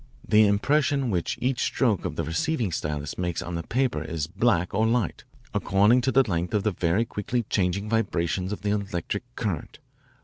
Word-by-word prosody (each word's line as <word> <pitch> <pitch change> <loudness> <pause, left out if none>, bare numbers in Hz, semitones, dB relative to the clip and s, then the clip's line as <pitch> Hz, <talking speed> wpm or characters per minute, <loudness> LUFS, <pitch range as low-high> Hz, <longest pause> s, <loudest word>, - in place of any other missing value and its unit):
The 105 0 +6
impression 135 +5 +2
which 90 -3 -1
each 130 0 0
stroke 115 -8 +1
of - - -3
the - - -1
receiving 110 - -1
stylus 75 -2 -3
makes 90 -2 -2
on 85 - -6
the 85 - -2
paper 125 +8 0
is 80 -2 -3
black 90 0 +1
or 110 +1 +2
light, 115 -5 0 0.3
according 105 +6 +3
to 130 - +1
the 135 -1 +4
length 85 0 -1
of 105 - +1
the 105 - +1
very 90 +6 +1
quickly 115 +3 -2
changing 100 +1 0
vibrations 95 -4 0
of 105 - -4
the 100 - +1
electric 100 -1 -2
current. 100 -10 -3
100 Hz, 180 wpm, -26 LUFS, 85-120 Hz, 0.3 s, The